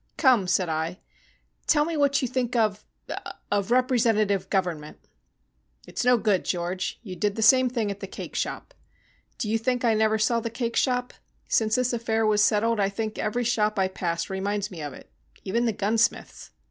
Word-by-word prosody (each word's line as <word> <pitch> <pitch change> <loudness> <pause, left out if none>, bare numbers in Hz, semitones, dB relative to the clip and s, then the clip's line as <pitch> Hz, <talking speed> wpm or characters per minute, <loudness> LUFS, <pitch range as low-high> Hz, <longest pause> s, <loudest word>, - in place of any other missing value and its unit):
"Come," 245 -9 +4
said 180 0 +2
I, 160 +2 -2 0.7
"tell 295 -1 +4
me 330 0 -3
what 280 -2 +2
you - - +1
think 250 -1 -2
of 215 -3 0 0.6
of 205 0 0
representative 225 -6 +2
government." 175 -6 -2 0.9
"It's - - -4
no 250 0 +5
good, 210 -5 +1
George. 180 +1 -3
You 190 -5 -7
did 205 +1 -1
the 220 - -1
same 255 +2 +6
thing 230 -4 -1
at 200 - -7
the 195 - -6
cake - - -8
shop. - - -3 0.6
Do 225 - -3
you 225 +1 +1
think 245 +1 0
I 230 - +4
never 220 0 +2
saw 230 +2 +2
the 230 0 -4
cake 235 0 -3
shop? 250 -1 0 0.3
Since 220 -1 +2
this 250 0 +1
affair 225 -1 0
was 210 -1 +3
settled 225 +2 +2
I 195 -1 +2
think 215 +2 -4
every 240 +3 -1
shop 215 -3 +1
I 190 -1 +2
pass 170 -2 -2
reminds 200 +2 -2
me 170 -4 -8
of 145 -2 -5
it - - -14 0.3
even 235 +5 0
the 230 - +2
gunsmith's. 220 +3 -1
220 Hz, 185 wpm, -26 LUFS, 195-240 Hz, 0.9 s, same